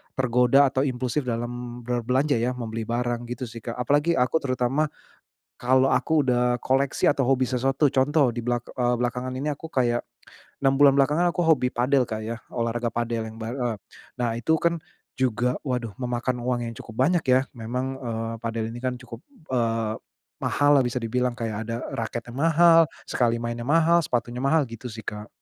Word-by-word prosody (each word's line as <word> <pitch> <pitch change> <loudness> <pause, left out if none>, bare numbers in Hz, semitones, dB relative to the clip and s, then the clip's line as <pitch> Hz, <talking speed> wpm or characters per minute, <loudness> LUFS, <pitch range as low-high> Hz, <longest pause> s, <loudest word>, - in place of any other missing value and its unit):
tergoda 125 +2 +4
atau 135 +1 0
impulsif 130 +1 -2
dalam 120 +1 -4
berbelanja 125 +3 +1
ya, 125 +2 0
membeli 115 -2 -4
barang, 120 0 -1
gitu 130 - -7
sih, 115 -1 -8
Kak. 115 +1 -6
Apalagi, 145 +7 +2
aku 125 +5 +2
terutama 130 +2 0 0.7
kalau 130 +2 +3
aku 160 -1 +2
udah 125 -2 +1
koleksi 135 +1 +1
atau 140 -1 +1
hobi 130 -1 +2
sesuatu 135 +3 +2
contoh 140 +2 +3
di 120 - -5
belak 120 -1 -1
eee, 125 -1 +1
belakangan 125 +1 -2
ini 145 +3 -2
aku 145 +3 -7
kayak, 120 -5 0 0.6
6 135 - +4
bulan 140 -1 +7
belakangan 150 +6 +3
aku 175 0 -1
hobi 135 -6 +3
padel, 125 +1 +2
Kak, 110 0 -4
ya, 115 +1 -5
olahraga 115 0 -1
padel 115 -1 -2
yang 110 - -12
bar 115 +1 -5
eee. 120 -4 -1 0.4
Nah, 120 -1 0
itu 160 +7 +2
kan 170 0 0 0.3
juga, 125 -1 0
waduh, 125 -6 -3
memakan 125 0 -2
uang 120 0 -1
yang 115 - -5
cukup 110 - -12
banyak, 165 +6 +2
ya. 130 +1 +5
Memang, 125 +3 -4
eee, 115 -1 -3
padel 115 -1 -3
ini 120 - -7
kan 130 -1 -1
cukup, 120 -1 -11 0.3
eee, 115 -3 0 0.5
mahal 145 0 +3
lah 130 - +3
bisa 125 +1 -1
dibilang, 125 +2 0
kayak 115 -3 -3
ada 115 0 -2 0.2
raketnya 120 +1 -5
mahal, 165 +3 +6 0.2
sekali 115 -1 +1
mainnya 120 0 -4
mahal, 165 +3 +4
sepatunya 120 -1 -2
mahal, 155 +2 +3
gitu 115 +2 -8
sih, 110 0 -9
Kak. 105 +1 -6
125 Hz, 180 wpm, -25 LUFS, 120-135 Hz, 0.7 s, bulan